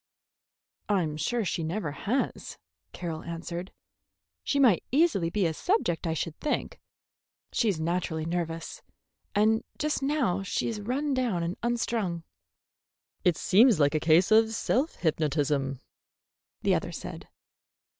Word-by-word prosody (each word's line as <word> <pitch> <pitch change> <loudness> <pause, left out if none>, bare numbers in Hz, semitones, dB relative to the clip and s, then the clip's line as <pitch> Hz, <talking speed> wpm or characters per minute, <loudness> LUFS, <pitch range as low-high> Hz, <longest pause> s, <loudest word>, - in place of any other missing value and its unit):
"I'm 175 -7 +1
sure 220 +9 -1
she 170 - -1
never 165 0 -2
has," 210 - -2 0.3
Carroll 165 -3 -5
answered. 170 +2 -6 0.7
"She 280 - 0
might 240 -10 +5
easily 275 - +3
be 200 +1 0
a 165 - +1
subject, 180 - 0
I 160 - 0
should 165 0 -3
think. 300 - -2 0.7
She's 205 -8 +1
naturally 160 -1 -1
nervous, 165 -1 -3 0.5
and 220 +2 +3
just 300 -1 -1
now 270 -10 +1
she 195 - -1
is 220 -3 -3
run 270 +7 -1
down 240 -10 0
and 170 +2 -2
unstrung." 230 -7 -1 1.0
"It 175 -3 +3
seems 220 -1 +5
like 145 -1 +4
a 155 - +2
case 165 +6 +4
of 220 0 +5
self 275 +9 0
hypnotism," 145 -4 0 0.8
the - - +3
other - - -1
said. - - -7
180 Hz, 130 wpm, -28 LUFS, 165-230 Hz, 1.0 s, might